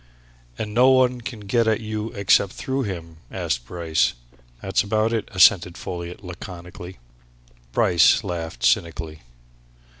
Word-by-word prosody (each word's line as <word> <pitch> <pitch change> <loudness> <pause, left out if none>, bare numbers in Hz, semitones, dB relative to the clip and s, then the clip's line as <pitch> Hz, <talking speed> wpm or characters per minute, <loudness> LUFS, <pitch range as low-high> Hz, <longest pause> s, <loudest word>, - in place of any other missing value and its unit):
"And 105 -1 -4
nobody 125 +1 +4
can 120 -2 -7
get 115 +3 +1
at 110 -1 +2
you 110 0 -4
except 100 -2 +3
through 135 0 -3
him?" 85 -7 -6
asked - - -3
Bryce. 80 -3 0 0.5
"That's - - 0
about 110 +2 0
it," 115 - -2
assented 90 -1 +4
Folliot 85 +1 -7
laconically. 90 0 -9 0.7
Bryce 95 -8 +4
laughed 85 -2 -4
cynically. 80 -2 0
95 Hz, 120 wpm, -23 LUFS, 85-110 Hz, 0.7 s, nobody